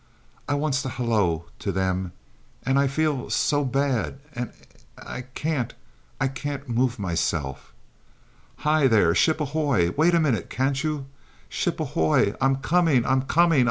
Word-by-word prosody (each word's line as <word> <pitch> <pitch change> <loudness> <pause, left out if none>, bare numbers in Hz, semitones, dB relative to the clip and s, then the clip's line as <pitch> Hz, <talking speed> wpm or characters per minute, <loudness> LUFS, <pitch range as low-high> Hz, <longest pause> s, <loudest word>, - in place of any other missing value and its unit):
I 145 - +2
wants 145 -2 0
to 135 - -3
halloo 110 -10 0 0.2
to 95 -2 -2
'em 95 -1 -1 0.5
and 135 +2 +3
I 140 - +3
feels 145 -1 0
so 145 0 +2
bad 135 -1 -1
and 125 0 -4 0.5
I 125 - -7
can't, 150 -7 -2 0.4
I 135 - +2
can't 140 +1 -5
move 125 +1 +1
myself. 80 - -2 0.9
Hi, 155 -2 +4
there! 100 -9 +4
Ship 155 - +3
ahoy! 140 - +1
Wait 170 +4 +4
a - - +4
minute 130 - 0
can't 135 +2 0
you? 150 -3 -2 0.4
Ship - - -2
ahoy! 80 +5 +2
I'm 135 0 +3
coming 150 -2 +2
I'm 130 0 +2
comi 165 +2 +3
ing. - - +6
135 Hz, 150 wpm, -25 LUFS, 110-145 Hz, 0.9 s, ing